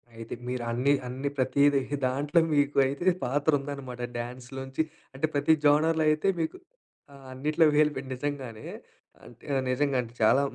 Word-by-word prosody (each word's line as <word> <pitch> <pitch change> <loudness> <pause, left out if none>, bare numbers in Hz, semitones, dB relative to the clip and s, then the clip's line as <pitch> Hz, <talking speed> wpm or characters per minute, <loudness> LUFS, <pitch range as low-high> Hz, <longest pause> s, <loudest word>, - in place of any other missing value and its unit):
అయితే 115 0 -7
మీరు 125 -1 -3
అన్ని 130 +4 +2
అన్ని 130 +3 -3
ప్రతీదీ 140 +2 +3
హి 145 - -1
దాంట్లో 145 +6 +1
మీకు 145 0 +2
అయితే 145 +8 +1
పాత్ర 145 +4 +1
ఉందనమాట. 135 -3 -7 0.2
డాన్స్‌‌‌‌‌‌‌‌‌‌‌‌‌‌‌‌‌‌‌‌‌‌‌‌‌‌‌‌‌‌‌‌‌లోంచి 130 +4 -4 0.3
అంటే 135 +4 0
ప్రతి 145 +2 +3
జోనర్‌లో 155 +2 +4
అయితే 155 +4 +1
మీకు 160 - -2 0.6
ఆహ్, 140 -1 -14
అన్నిట్లో 150 +5 +2
వేలు 150 0 +4
పే 135 - -3
నిజంగానే, 130 -4 -5 1.0
నిజంగా 140 +1 +1
అంటే 115 -1 -10
చాలా 110 +5 +5
140 Hz, 140 wpm, -28 LUFS, 130-145 Hz, 1.0 s, చాలా